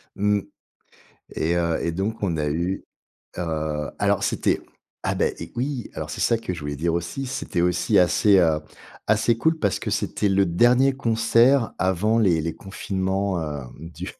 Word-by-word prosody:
Mmh, 105 0 +1 0.9
et 85 +2 0
heu, 85 -1 +1
et 85 - -1
donc, 105 +6 -3
on 85 -5 0
a 75 -1 -1
eu 85 +5 -2 0.5
heu, 80 -3 -2
alors - - +1
c'était - - 0 0.5
ah, - - +1
bah - - +1
et - - -8
oui! 125 -1 -3
Alors, - - -5
c'est - - -4
ça 115 - +3
que 95 -5 -4
je 80 - -8
voulais 75 -1 -4
dire 85 +3 0
aussi, 85 +11 -3
c'était 100 -7 -3
aussi 90 +5 +2
assez, 95 +3 +4
heu, 80 -4 +3 0.5
assez 110 +2 +2
cool 160 +6 +1
parce 100 -7 0
que - - -4
c'était 100 - 0
le 95 0 +3
dernier 120 +9 +4
concert 115 +1 +3
avant 95 +5 +1
les 90 -7 +3
les 80 +1 -3
confinements, 95 -1 -2
heu, 75 -3 -4 0.2
du 85 +3 -8
95 Hz, 175 wpm, -23 LUFS, 85-110 Hz, 0.9 s, assez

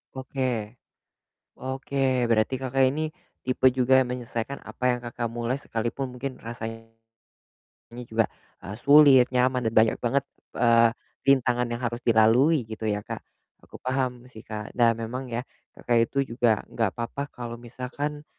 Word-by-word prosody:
Oke. 130 -4 -3 0.8
Oke, 130 -1 -1
berarti 115 +3 +1
Kakak, 135 0 +1
ini 155 +3 -2 0.3
tipe 130 0 +3
juga 130 +1 +3
yang 130 - -1
menyelesaikan 125 +1 -4
apa - - -11
yang 125 - -1
Kakak, 120 0 -4
mulai 120 +2 -2
sekalipun 125 0 -3
mungkin 130 +1 -5
rasanya 115 -1 -7 1.1
juga, 115 -1 0 0.3
eee, 100 +4 -7
sulit, 140 0 +7
nyaman 125 0 +2
dan 110 - 0
banyak 110 0 +4
banget, 135 +3 0 0.3
eee, 115 -1 +5 0.4
rintangan 125 -3 +3
yang 120 - -3
harus 120 -1 -3
dilalui 115 +4 +4
gitu 110 0 -7
ya 105 -1 0
Kak. - - -7 0.4
Aku - - -13
paham 130 -1 -2
sih 110 -3 -12
Kak. 105 -1 -6
Nah 120 -2 +5
memang 115 +3 -5
ya 115 - -1 0.3
Kakak, 120 -1 +2
itu 135 -4 -2
juga 115 -4 +3
enggak 115 -5 -1
apa-apa 140 +5 -5
kalau 120 -1 -6
misalkan, 130 +5 -5
120 Hz, 145 wpm, -26 LUFS, 115-130 Hz, 1.1 s, sulit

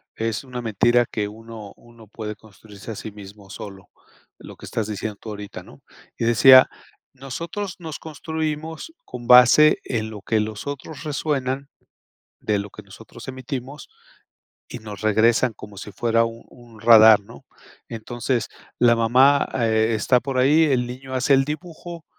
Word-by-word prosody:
Es 110 -2 -3
una 125 -2 -7
mentira 120 +2 +2
que 105 -2 -2
uno 110 -1 -11
uno 115 -2 -18
puede 105 0 -7
construirse 105 0 -13
a - - -6
sí 110 - -8
mismo 100 -1 -13
solo, 95 -1 -10 0.5
lo - - -12
que - - -12
estás 110 -2 -3
diciendo 105 0 -5
tú 110 - -10
ahorita, 105 -1 -8
¿no? - - -17 0.4
Y - - -2
decía, 130 +3 +7 0.5
nosotros 170 +9 -6
nos 160 -3 -7
construimos 160 - -5
con 120 -1 -9
base 125 +5 +7
en 110 -3 -3
lo 105 -2 -9
que 110 +2 0
los 110 +3 -6
otros 145 +3 -7
resuenan 140 -2 -2 0.7
de 105 -1 0
lo 100 +1 -6
que 105 - -13
nosotros 115 +4 -14
emitimos 130 +2 -7 0.8
y 125 - -7
nos 105 -2 -9
regresan 110 +3 +2
como 105 -1 -12
si 105 +1 -9
fuera 115 +2 +1
un 115 0 -7
un 120 -3 -17
radar, 110 -2 +7
¿no? 100 - -15 0.4
Entonces 120 +1 -3 0.3
la 120 -1 +5
mamá, 130 +5 +4
eh, 110 0 +2
está 125 +3 +2
por 135 0 -3
ahí. 150 +5 +4
El 130 -5 +1
niño 130 +1 -8
hace 130 +2 +3
el 135 0 +3
dibujo. 165 +2 -8
120 Hz, 160 wpm, -22 LUFS, 110-135 Hz, 0.8 s, decía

